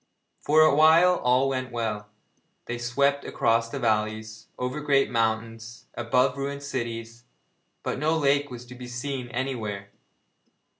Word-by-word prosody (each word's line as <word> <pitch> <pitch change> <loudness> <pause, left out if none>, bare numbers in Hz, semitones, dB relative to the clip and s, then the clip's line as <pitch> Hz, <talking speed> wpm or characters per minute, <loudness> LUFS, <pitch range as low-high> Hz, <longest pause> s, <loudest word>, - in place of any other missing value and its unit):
For 155 +2 +4
a 155 - +6
while 165 +4 +6
all 125 +2 +2
went 130 -1 -3
well. 110 -3 -3 0.6
They 120 0 -4
swept 140 +4 +1
across 115 0 +1
valleys, 110 -3 -2
over 125 +4 -3
great 140 -3 +2
mountains, 115 0 -2
above 125 +3 +1
ruined 140 +1 -4
cities, 115 -3 -5 0.6
but - - -3
no 155 +3 +1
lake 145 -1 +2
was 125 -1 -9
to 125 - -11
be 125 0 -9
seen 125 +1 -4
anywhere. 110 -6 -4
125 Hz, 135 wpm, -26 LUFS, 115-140 Hz, 0.6 s, a